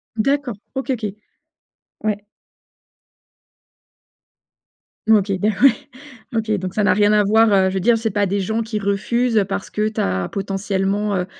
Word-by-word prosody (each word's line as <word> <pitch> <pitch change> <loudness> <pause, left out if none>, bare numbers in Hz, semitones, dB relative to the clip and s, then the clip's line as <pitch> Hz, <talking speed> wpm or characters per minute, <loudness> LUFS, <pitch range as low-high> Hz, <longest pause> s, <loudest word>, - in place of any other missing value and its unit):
D'accord 275 0 0 0.2
OK, 265 0 -2
OK. 230 -4 -2 1.0
Ouais. 205 -1 -1 2.9
OK 205 -2 +4
beh, 215 +3 +2
ouais, 275 - +9 0.6
OK 220 -1 -1
donc 185 0 -5
ça 210 - 0
n'a 200 - +4
rien 205 +1 +3
à 210 -1 +4
voir, 220 +2 +4
heu, 190 -1 +4
je 190 - -5
veux 190 - +1
dire 230 +4 +3
c'est 225 0 -1
pas 205 0 +1
des 200 +1 -1
gens 220 +4 -1
qui 220 -1 -4
refusent, 220 +4 0
heu, 200 - +3
parce 200 0 -4
que 210 0 -1
tu 215 - -2
as 95 -1 -1
potentiellement, 195 +1 -1
heu 180 - -1
210 Hz, 165 wpm, -20 LUFS, 195-225 Hz, 2.9 s, ouais